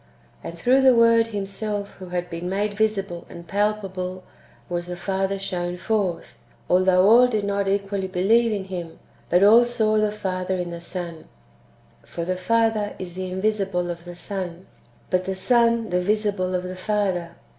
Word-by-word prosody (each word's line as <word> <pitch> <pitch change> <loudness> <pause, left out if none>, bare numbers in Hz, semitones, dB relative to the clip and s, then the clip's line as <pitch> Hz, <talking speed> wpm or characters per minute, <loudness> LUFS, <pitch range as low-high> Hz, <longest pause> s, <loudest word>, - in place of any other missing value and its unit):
And 170 - -7
through 255 +9 +3
the 260 -2 +6
Word 230 0 +5
Himself 205 0 -4
who 185 - -8
had 180 0 -2
been 170 +1 -5
made 205 +2 -1
visible 200 -5 -1
and 170 0 -11
palpable, 190 -2 -2 0.4
was 175 -1 -3
the 180 - -4
Father 195 +1 -1
shown 180 -2 -3
forth, 200 -3 -2 0.3
although 185 +1 +4
all 240 +3 +7
did 215 -4 -1
not 200 0 -1
equally 195 0 -1
believe 220 +6 +3
in 205 -2 -2
Him; 175 -3 -7 0.3
but 180 +3 +4
all 225 +4 +8
saw 225 -3 +1
the 215 -1 +2
Father 190 -3 -2
in 175 -1 -3
the 170 0 -7
Son: 170 -2 -7 0.8
for 170 - -5
the 185 +1 -1
Father 225 +1 +1
is 180 -2 -7
the 185 0 -4
invisible 190 -2 -1
of 170 0 -8
the 175 0 -8
Son, 185 -1 -6 0.5
but 185 0 +1
the 190 - -2
Son 230 +1 +2
the 180 0 +2
visible 200 -2 0
of 180 - -1
the 185 0 -6
Father. 185 -4 -1
195 Hz, 170 wpm, -23 LUFS, 180-210 Hz, 0.8 s, all